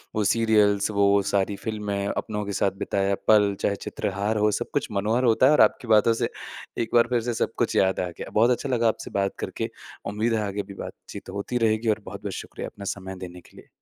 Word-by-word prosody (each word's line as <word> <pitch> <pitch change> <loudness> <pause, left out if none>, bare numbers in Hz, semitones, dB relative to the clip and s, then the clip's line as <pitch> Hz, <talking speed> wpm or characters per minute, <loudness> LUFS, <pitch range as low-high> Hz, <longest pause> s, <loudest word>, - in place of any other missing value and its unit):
वो 110 - +1
सीरियल्स 105 -2 +3
वो 100 -1 +4
सारी 100 0 +1
फिल्में 105 -3 -2
अपनों 105 0 -3
के 100 - -4
साथ 100 0 +1
बिताया 100 0 0
पल। 105 -2 +5
चाहे 100 - +1
चित्रहार 100 +2 -2
हो 105 0 +3
सब - - -5
कुछ - - 0
मनोहर 110 +5 +1
होता 120 +2 +4
है 140 - +6
और 150 - +5
आपकी 120 - +3
बातों 110 +1 +5
से - - +1 0.5
एक 110 - -6
बार 120 0 +6
फिर 120 -2 +1
से 120 +1 -2
सब - - -3
कुछ - - 0
याद 95 0 +3
आ 90 - -1
गया। - - -7
बहुत 115 +3 +4
अच्छा 130 +3 -1
लगा 120 -2 +2
आपसे 110 - -2
बात 100 0 -1
करके। - - -3 0.4
उम्मीद 115 +2 0
है 110 - +1
आगे 100 +1 -3
भी 100 0 -10
बातचीत - - -10
होती 120 +5 -2
रहेगी 110 +1 0
और 105 - +2
बहुत-बहुत - - -6
शुक्रिया - - -6
अपना 100 - -10
समय 95 -1 -8
देने 90 -1 -8
के - - -21
लिए। - - -14
105 Hz, 225 wpm, -25 LUFS, 100-115 Hz, 0.5 s, है